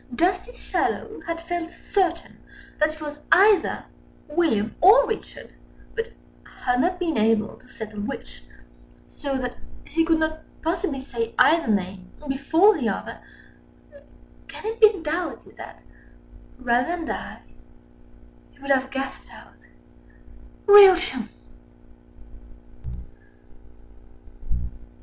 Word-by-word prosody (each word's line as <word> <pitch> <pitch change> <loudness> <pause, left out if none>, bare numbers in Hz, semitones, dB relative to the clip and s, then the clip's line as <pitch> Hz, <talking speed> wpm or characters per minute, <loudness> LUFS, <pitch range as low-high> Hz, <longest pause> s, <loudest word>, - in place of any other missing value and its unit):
Justice 370 - 0
Shallow - - -2
had 335 0 -3
felt 335 0 -4
certain 350 -1 -2 0.4
that 310 +1 +2
it 315 - -15
was 295 -1 -7
either 395 0 +4 0.4
William 295 -10 0
or 435 +8 +7
Richard, 445 - -6 0.4
but 455 +1 -4 0.5
had 250 0 +2
not 360 +3 0
been 330 -8 -1
able 215 0 +1
to 255 - -22
settle 215 -4 -8
which, - - -7 0.7
so 275 -2 -4
that 250 -1 -4 0.3
he 330 - 0
could 325 0 +2
not 315 0 -1 0.2
possibly 330 -3 -1
say 235 -3 -5
either 330 -2 +4
name 190 -3 -2 0.2
before 320 +10 +3
the - - 0
other, - - -5 1.3
can - - -10
it 450 +1 -4
be 425 -3 +6
doubted 320 0 -4
that, - - -11 0.7
rather 250 -1 +1
than 330 - -5
die, - - -6 1.1
he - - -25
would 280 0 -3
have 265 -1 +2
gasped 270 0 -6
out - - -17 1.0
"Rilchiam!" 365 - +7
315 Hz, 110 wpm, -24 LUFS, 250-360 Hz, 1.3 s, or